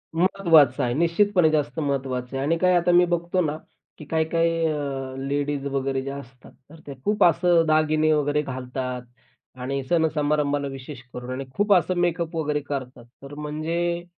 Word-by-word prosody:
महत्त्वाचं 165 -7 +4
आहे. 120 -1 0
निश्चितपणे 170 +3 +3
जास्त 150 0 -1
महत्वाचं 135 -3 -2
आहे. 135 - -2
आणि 165 +2 +1
काय 180 +1 +3
आता 175 0 +3
मी 175 0 +6
बघतो 175 +1 0
ना, 150 +1 -2 0.4
की 155 - -10
काही-काही 165 +2 +1
अ, 140 -4 -3
लेडीज 145 0 -2
वगैरे 135 -1 -1
जे 135 - -5
असतात, 135 -2 -11 0.2
तर 160 +1 -14
ते 140 - -6
खूप 210 0 +2
असं 170 0 +4
दागिने 155 0 +3
वगैरे 150 0 +1
घालतात 125 -2 -5 0.6
आणि 135 +2 -3
सण 160 +4 +2
समारंभाला 145 -1 0
विशेष 135 -1 -8
करून 125 +1 -6
आणि 135 +1 -4
खूप 205 0 +3
असं 185 0 +2
मेकअप 170 -1 -1
वगैरे 150 -2 0
करतात. 130 -4 -6 0.2
तर 140 +1 -10
म्हणजे 165 +3 -2
150 Hz, 165 wpm, -24 LUFS, 135-170 Hz, 0.6 s, मी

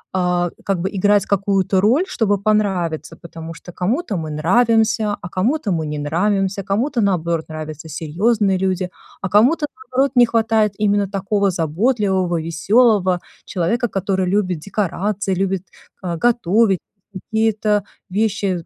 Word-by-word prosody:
а, 180 -1 +1
как 195 -3 0
бы 190 - -1
играть 205 +1 +2
какую-то 195 -1 +1
роль, 260 - +3
чтобы 205 - +1
понравиться, 195 -6 0
потому 165 -1 -9
что 175 +3 -11
кому-то 220 - -1
мы 160 -1 -4
нравимся, 215 +6 +2
а 175 - -8
кому-то 220 - 0
мы 160 -3 -1
не 150 - -4
нравимся. 195 +6 0
Кому-то, 230 +6 0
наоборот, 170 -4 0
нравятся 155 0 -7
серьёзные 195 - +1
люди, 185 -1 -1 0.3
а 195 - -2
кому-то, 260 - +4
наоборот, 275 -11 -1
не 245 - +7
хватает 220 -2 +2
именно 205 -2 +1
такого 200 0 0
заботливого, 185 - 0
весёлого 185 +2 +2 0.2
человека, 210 +7 0
который 190 -2 -1
любит 185 -4 0
декорации, 200 +1 -2
любит 190 0 -1 0.4
го 175 -2 -2
готовить 220 -4 +3 0.3
какие-то 215 0 0 0.3
вещи. 200 -3 -1
195 Hz, 130 wpm, -19 LUFS, 180-215 Hz, 0.4 s, не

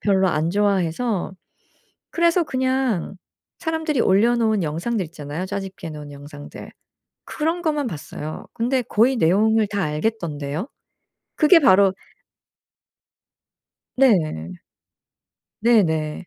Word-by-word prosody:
별로 190 -2 +2
안 155 0 0
좋아해서 200 +1 0 0.8
그래서 340 +1 +2
그냥 260 - -1 0.4
사람들이 320 -4 -1
올려놓은 220 +1 +3
영상들 180 +8 -2
있잖아요. 155 +2 -6
짜집기 195 -3 -6
해 - - -7
놓은 150 -1 -9
영상들. 145 +1 -11 0.6
그런 325 +3 -2
것만 300 -4 0
봤어요. 155 -3 -7
근데 250 +3 0
거의 235 +4 +2
내용을 215 +4 +3
다 200 -1 -2
알겠던데요. 155 - -3 0.7
그게 330 +2 +6
바로 195 -6 +5 2.0
네. 155 - +1 1.1
네네. 170 -9 +1
200 Hz, 230 characters per minute, -22 LUFS, 160-240 Hz, 2.0 s, 그게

